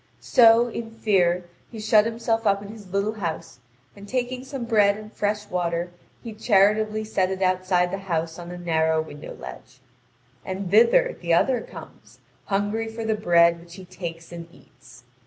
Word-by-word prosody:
So, 230 0 +5
in 230 -1 -6
fear, 185 -6 +1 0.2
he 225 - -9
shut 215 0 +4
himself 225 -1 -1
up 200 0 +2
in 200 - -10
his 210 -3 -11
little 200 +2 0
house, 165 - -5 0.4
and 200 0 -12
taking 255 0 -2
some 265 -2 -6
bread 210 -3 +3
and 215 0 -11
fresh 210 0 -2
water, 175 -1 -2 0.3
he 230 - -7
charitably 215 0 +2
set 190 -3 0
it 190 0 -2
outside 185 -1 +1
the 195 - -3
house 165 -3 -3
on 175 0 -8
a 180 - -7
narrow 160 -2 +1
window 150 -2 -7
ledge. - - -11 0.6
And 190 -1 -5
thither 235 - +4
the 170 -1 +2
other 245 +6 +2
comes, - - -13 0.3
hungry 205 +3 -1
for 225 0 -6
the 220 - +1
bread 170 -4 +3
which 170 0 -14
he 190 -2 -11
takes 170 -2 -8
and 170 -1 -8
eats. 125 -6 -19
200 Hz, 175 wpm, -24 LUFS, 175-220 Hz, 0.6 s, So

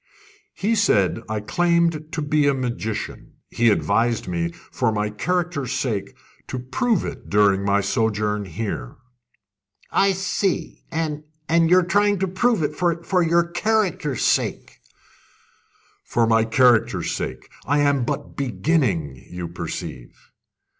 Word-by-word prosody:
"He 210 +4 0
said 115 - +2
I 110 -1 -2
claimed 170 +3 +1
to 155 - -2
be 150 0 +2
a 140 - +3
magician. 120 -4 -4 0.2
He 120 0 +3
advised 115 +2 +1
me, 85 -1 -1 0.2
for - - +1
my 105 0 -1
character's 165 0 -1
sake, 110 -7 -2 0.3
to 130 - -4
prove 145 - 0
it 135 -2 -7
during 100 -1 +3
my 100 0 +2
sojourn 105 0 0
here." 95 - -5 1.0
"I 195 0 +3
see. 190 0 -2
And 155 -2 -2 0.3
and 165 0 +3
you're 180 0 +5
trying 205 +2 +3
to 190 +1 0
prove 195 +1 +1
it 150 0 -1
for 175 +2 0
your 170 0 +3
character's 175 - 0
sake?" - - 0 1.2
"For 115 - +1
my 115 0 +3
character's 120 0 +3
sake! - - -5 0.2
I 145 +2 +3
am 140 -3 +2
but - - -4
beginning, 115 - 0
you 90 -1 -5
perceive." 85 -6 -7
135 Hz, 130 wpm, -22 LUFS, 105-170 Hz, 1.2 s, you're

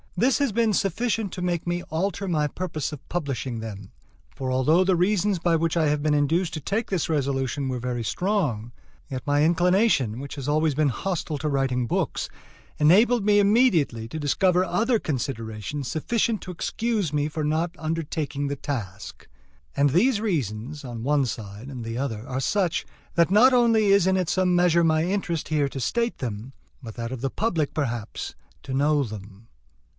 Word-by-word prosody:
This 255 +4 +3
has 280 -4 +1
been 225 0 +2
sufficient 210 +2 0
to 180 - -4
make 175 -2 -1
me 175 0 -2
alter 195 +5 -2
my 155 -4 +1
purpose 155 -1 -4
of 150 - -10
publishing 135 -8 -3
them; 100 -3 -8 0.4
for 130 -1 -3
although 150 +8 +3
the 185 0 +2
reasons 195 +2 +2
by 170 0 +2
which 165 +1 0
I 160 -2 +3
had 150 0 0
been 155 -1 +2
induced 165 +4 +1
to - - -3
take 200 - -2
this 185 -5 -1
resolution 135 -2 -1
were 125 -1 -2
very 120 -1 -3
strong, 140 - -1 0.4
yet 130 -2 -5
my 145 +1 +3
inclination, 175 - +2
which 140 +1 -7
has 140 -2 -6
always 155 +1 +2
been 150 -1 +2
hostile 160 +1 -3
to 155 - -2
writing 135 -3 0
books, - - -1 0.5
enabled 210 +9 +5
me 205 -1 +5
immediately 200 - +3
to 160 - -5
discover 180 +5 +2
other 225 +6 +1
considerations 125 - -4
sufficient 225 +6 0
to 185 - -7
excuse 205 -1 -2
me 145 0 +1
for 155 0 -4
not 160 +3 0
undertaking 155 -3 -3
the 140 - -2
task. 105 -9 -6 0.5
And 140 0 +3
these 210 - +3
reasons, 145 - -2
on 120 -3 -6
one 140 +1 +2
side 105 +1 -7
and 130 -4 -6
the 115 +1 -4
other, 115 -4 -3
are 130 0 -2
such, 180 +5 0 0.3
that 170 +1 +3
not 245 +6 +6
only 230 -3 +4
is 200 -2 +5
it 190 0 +3
in 185 -3 0
some 185 0 +2
measure 175 -1 +4
my 160 -1 +3
interest 175 -4 -2
here 150 -3 +1
to 135 - -6
state 235 - -1
them, 120 +1 -5 0.3
but 115 -4 -9
that 115 0 -4
of 130 -3 -5
the 135 -1 -1
public, 170 -9 -1
perhaps, 120 -7 -3 0.3
to 135 - -5
know 145 +2 +2
them. 105 -1 -9
155 Hz, 180 wpm, -25 LUFS, 130-185 Hz, 0.5 s, not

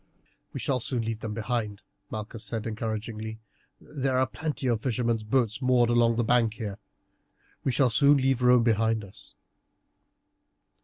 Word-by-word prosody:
"We - - -6
shall 130 -2 0
soon 120 0 +1
leave 110 -1 -3
them 110 -2 -5
behind," 110 -2 -3 0.3
Malchus 110 +1 -6
said 110 0 -4
encouragingly. 110 0 -4 0.4
"There 135 -3 -2
are 130 - +3
plenty 150 0 -5
of 115 -3 +1
fishermen's 120 -2 0
boats 115 +1 0
moored 125 -2 +3
along 120 -1 +3
the 120 - +1
bank 115 -1 +2
here. 105 -2 -6 0.8
We 135 - +1
shall 125 -1 +2
soon 140 +5 +5
leave 135 -2 +1
Rome 125 -1 +5
behind 110 -1 +1
us." 100 -1 -12
115 Hz, 150 wpm, -27 LUFS, 110-125 Hz, 0.8 s, soon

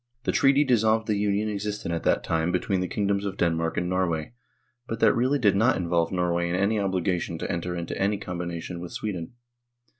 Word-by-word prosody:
The - - +1
treaty 140 +1 +4
dissolved 110 -4 +2
the 105 - 0
Union 105 +1 +1
existent 105 -3 -3
at 85 - -2
that - - +2
time 80 +1 0
between 90 +1 0
the 90 - -1
kingdoms 100 0 0
of 100 -2 -4
Denmark 85 -1 0
and 90 - 0
Norway, 90 -1 -1 0.5
but 115 - -4
that - - +5
really 130 +4 +2
did 105 -7 +3
not 110 +6 +3
involve 85 -2 0
Norway 85 -1 0
in 90 - 0
any 100 +3 +1
obligation 90 -3 -1
to - - -3
enter 90 +1 -3
into 85 -1 -4
any 100 +1 +2
combination 85 -1 -5
with 85 0 -7
Sweden. 95 -3 -4
95 Hz, 200 wpm, -26 LUFS, 85-105 Hz, 0.5 s, that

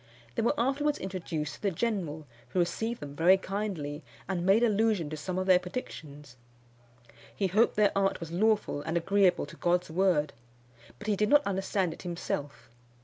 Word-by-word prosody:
They - - -1
were 235 +6 +1
afterwards 280 +4 +1
introduced 170 -5 -4
to - - -13
the 205 - +1
general, 175 -6 -2 0.2
who 180 - -1
received 220 +6 -1
them 145 -1 -7
very 175 +5 +5
kindly, 190 -7 -4 0.3
and 180 -2 -2
made 195 +6 +4
allusion 210 -7 +2
to - - -3
some 180 +5 -4
of 185 - -1
their 185 -1 +6
predictions. 150 - -8 1.0
He 200 - 0
hoped 210 +6 +3
their 210 -1 +3
art 195 0 +1
was 165 -2 -7
lawful 210 -4 +1
and 160 +3 -2
agreeable 190 0 +2
to 145 - -12
God's 175 -1 0
word; 165 -4 +2 0.6
but - - -11
he 215 -1 +1
did 210 +2 +1
not 290 0 +5
understand 190 -2 -1
it - - -12
himself. 170 -5 -4
185 Hz, 175 wpm, -29 LUFS, 160-210 Hz, 1.0 s, their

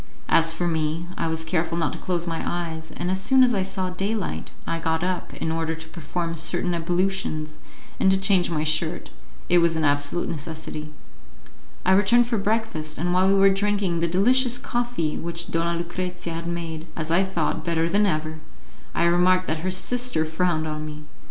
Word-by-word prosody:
As 165 0 +5
for 165 +2 -2
me, 160 0 -1
I 165 - -1
was 160 0 -1
careful 165 0 -1
not 160 -3 0
to - - -6
close 175 -2 -2
my 165 -1 -3
eyes, 160 -2 -4
and 175 +1 -1
as 190 0 -1
soon 265 +5 +5
as 245 -1 +4
I 195 - +1
saw 190 -1 -2
daylight 195 +3 -2 0.2
I 165 0 -2
got 160 0 0
up 180 -1 -2
in 160 - -2
order 160 0 -1
to 160 0 -9
perform 165 +1 -4
certain 170 +2 0
ablutions 170 -3 -1 0.4
and 190 - +4
to 190 - +4
change 190 -2 +3
my 155 -3 -1
shirt; 155 +2 0 0.4
it 175 - +5
was 170 -1 +3
an 160 - 0
absolute 145 +3 +1
necessity. 155 -1 -5 0.9
I 185 - +4
returned 205 +5 +5
for 235 -2 -1
breakfast, 200 -7 -1
and 175 +1 0
while 185 +1 +4
we 195 - +4
were 195 0 +6
drinking 195 -3 0
the 170 - +1
delicious 245 +8 +3
coffee 240 -11 -2
which 170 +1 -3
Donna 170 +1 0
Lucrezia 175 0 -4
had 165 +1 -4
made, 165 -1 -4
as 160 0 -2
I 180 +3 +4
thought, 170 -4 -1
better 165 0 +1
than 205 +4 +3
ever, 155 -2 -2 0.6
I - - +2
remarked 180 +2 +4
that 160 -2 -1
her 185 +4 -2
sister 185 0 0
frowned 160 0 0
on 155 -1 -4
me. 155 0 -7
170 Hz, 190 wpm, -24 LUFS, 160-190 Hz, 0.9 s, were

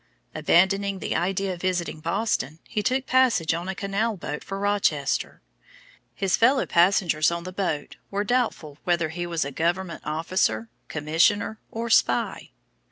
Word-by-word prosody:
Abandoning 195 +2 +2
the - - -3
idea 190 +1 0
of 175 - -9
visiting 180 -4 -1
Boston, 165 - -1
he 210 - -2
took 255 +5 0
passage 245 -12 +3
on 170 +3 -4
a 190 - -3
canal 200 +3 -1
boat 150 -3 -5
for 195 - -5
Rochester. 195 -8 0 0.7
His 195 -2 +1
fellow 260 +4 +3
passengers 170 -3 +3
on 170 0 -3
the 185 +1 -7
boat 175 -7 -3
were 200 +1 -1
doubtful 210 - -1
whether 170 -3 +1
he 175 +2 -4
was 170 -4 -1
a 140 - -4
government 170 +4 -1
officer, 175 +8 0 0.2
commissioner, 165 +9 +1
or 230 +1 -4
spy. 120 - +2
185 Hz, 150 wpm, -25 LUFS, 165-205 Hz, 0.7 s, passage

